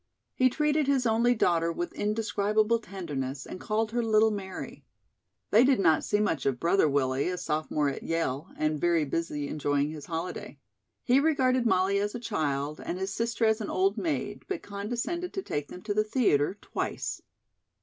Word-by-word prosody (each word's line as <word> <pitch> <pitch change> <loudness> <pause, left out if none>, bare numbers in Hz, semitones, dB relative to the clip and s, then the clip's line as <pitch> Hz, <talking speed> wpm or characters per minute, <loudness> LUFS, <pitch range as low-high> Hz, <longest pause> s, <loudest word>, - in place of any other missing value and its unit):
He 255 0 +4
treated 300 +2 +1
his 270 -3 +2
only 235 +2 +3
daughter 170 -5 +2
with 175 +1 -4
indescribable 215 +1 +1
tenderness, 145 - -5
and - - -8
called 220 +1 -1
her 240 +1 0
"Little 220 -1 +4
Mary." 190 -3 -6 0.7
They 225 +3 +7
did 260 -2 +4
not 160 -5 +4
see 205 - +1
much 160 -11 0
of 130 -3 0
"Brother 170 -1 +3
Willie," 135 +1 +1
a 180 - -2
sophomore 150 -2 -1
at 140 - -3
Yale, 165 -1 -2
and 155 -1 0
very 170 -3 +3
busy 150 -1 -2
enjoying 145 0 0
his 155 -2 -8
holiday. 170 +1 -5 0.5
He 255 +2 +4
regarded 260 -5 +2
Molly 195 -1 +2
as 205 +2 -2
a - - -3
child 150 -10 -2
and 175 - -3
his 190 +1 -3
sister 230 +1 0
as 220 0 +2
an 210 - -4
old 195 +2 +2
maid, 190 - -2
but 385 -3 -4
condescended 240 - -3
to 385 - -3
take 145 - -3
them 180 - -10
to 210 - -1
the 215 +1 +2
theatre 205 - +2
twice. - - -4
200 Hz, 180 wpm, -28 LUFS, 155-230 Hz, 0.7 s, They